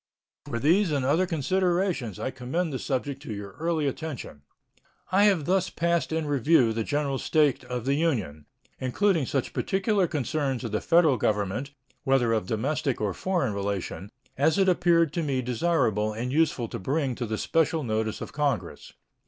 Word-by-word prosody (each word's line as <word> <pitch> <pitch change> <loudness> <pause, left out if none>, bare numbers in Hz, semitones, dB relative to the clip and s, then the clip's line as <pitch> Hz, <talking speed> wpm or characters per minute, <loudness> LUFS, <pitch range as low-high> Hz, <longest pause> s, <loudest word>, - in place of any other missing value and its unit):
For 115 - -3
these 170 - +3
and 140 -3 0
other 165 +7 +2
considerations 175 - 0
I 130 - -3
commend 135 +6 -3
the 130 - -2
subject 135 0 -3
to 115 - -6
your 100 -1 -7
early 165 -2 0
attention. 140 - -5 0.7
I 200 +2 +5
have 190 -8 +3
thus 185 0 +1
passed 170 0 0
in 160 -1 -1
review 140 -4 +3
the 115 0 -1
general 140 +1 -1
state 150 -4 +2
of 125 -1 -4
the 135 - +2
Union, 110 - -1 0.3
including 160 +3 +1
such 135 -3 -2
particular 195 -1 +1
concerns 145 -3 -2
of 115 - -4
the 105 - -1
Federal 165 -6 +4
Government, 105 +6 -1 0.3
whether 130 -4 +2
of 110 -4 -1
domestic 135 +5 -1
or 105 -3 -1
foreign 175 - -1
relation, 100 -1 -4 0.3
as 155 +4 +3
it 195 -1 +3
appeared 170 -4 +3
to 170 - -1
me 140 -4 -1
desirable 115 -5 +1
and 120 +4 -3
useful 150 -6 +1
to - - -5
bring 135 +5 -1
to 120 -1 -4
the 110 0 -2
special 160 +2 +1
notice 110 -2 -2
of - - -7
Congress. 135 - -2
140 Hz, 170 wpm, -26 LUFS, 115-165 Hz, 0.7 s, I